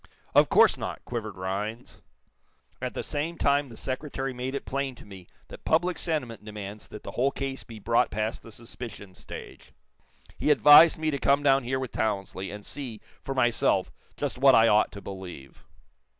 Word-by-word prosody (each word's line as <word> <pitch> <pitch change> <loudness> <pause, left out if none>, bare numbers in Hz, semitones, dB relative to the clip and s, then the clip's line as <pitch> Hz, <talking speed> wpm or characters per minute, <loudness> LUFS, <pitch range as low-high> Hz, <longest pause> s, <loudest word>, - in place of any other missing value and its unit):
"Of - - +5
course - - +5
not," - - -5
quivered 110 -5 -5
Rhinds. 105 +6 -5 0.8
"At - - -4
the - - -3
same 160 +4 -3
time 140 0 +2
the 115 -3 -12
Secretary 135 0 -4
made 125 +2 -4
it - - -4
plain 135 -1 -2
to - - -14
me 95 -3 -12 0.2
that - - -11
public 175 +3 +1
sentiment 130 -10 -2
demands 105 -1 -8
that 105 - -10
the - - -7
whole 130 +3 +1
case 135 -1 -5
be 115 -2 -11
brought 115 +3 +2
past 110 +1 -3
the 115 - -13
suspicion 115 -3 -8
stage. - - -11 0.7
He - - +1
advised 150 +2 +8
me 155 0 -1
to 140 - -2
come 140 +2 +3
down 135 -1 +4
here 130 +2 -1
with 130 -3 -4
Townsley, 95 -3 -2
and 105 0 -8
see, 125 -7 -6 0.2
for 135 - -5
myself, 120 -3 +2 0.3
just - - -3
what 135 0 +7
I 115 0 +6
ought 105 -1 +4
to 100 - -8
believe." 90 -8 -9
120 Hz, 180 wpm, -27 LUFS, 105-140 Hz, 0.8 s, advised